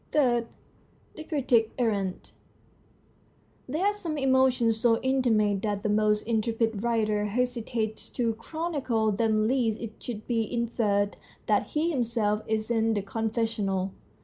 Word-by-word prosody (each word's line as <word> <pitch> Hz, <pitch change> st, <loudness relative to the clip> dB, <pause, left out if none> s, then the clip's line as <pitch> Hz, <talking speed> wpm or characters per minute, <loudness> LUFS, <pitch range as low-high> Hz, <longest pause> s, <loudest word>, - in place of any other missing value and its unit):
III. 240 Hz, -5 st, +3 dB, 0.7 s
THE 315 Hz, -, -8 dB
CRITIC 245 Hz, -8 st, +2 dB
ERRANT 200 Hz, -6 st, -1 dB, 1.4 s
There 315 Hz, +8 st, 0 dB
are 410 Hz, -, +3 dB
some 335 Hz, -7 st, -4 dB
emotions 260 Hz, -4 st, +3 dB
so 230 Hz, -1 st, +3 dB
intimate 225 Hz, -7 st, +2 dB
that 205 Hz, -1 st, -2 dB
the 215 Hz, -, 0 dB
most 210 Hz, 0 st, +2 dB
intrepid 225 Hz, -1 st, 0 dB
writer 215 Hz, -3 st, +1 dB
hesitates 230 Hz, -1 st, -2 dB
to 235 Hz, -3 st, 0 dB
chronicle 255 Hz, -4 st, -1 dB
them 215 Hz, +1 st, +2 dB
lest 230 Hz, -3 st, +1 dB
it 225 Hz, -2 st, -8 dB
should 220 Hz, -3 st, -6 dB
be 230 Hz, -3 st, -1 dB
inferred 220 Hz, -4 st, 0 dB, 0.3 s
that -, -, +2 dB
he 330 Hz, +3 st, +2 dB
himself 230 Hz, -6 st, 0 dB
is 220 Hz, +1 st, -1 dB
in 225 Hz, -1 st, +2 dB
the 205 Hz, -, -1 dB
confessional. 215 Hz, -3 st, -1 dB
225 Hz, 130 wpm, -27 LUFS, 215-245 Hz, 1.4 s, III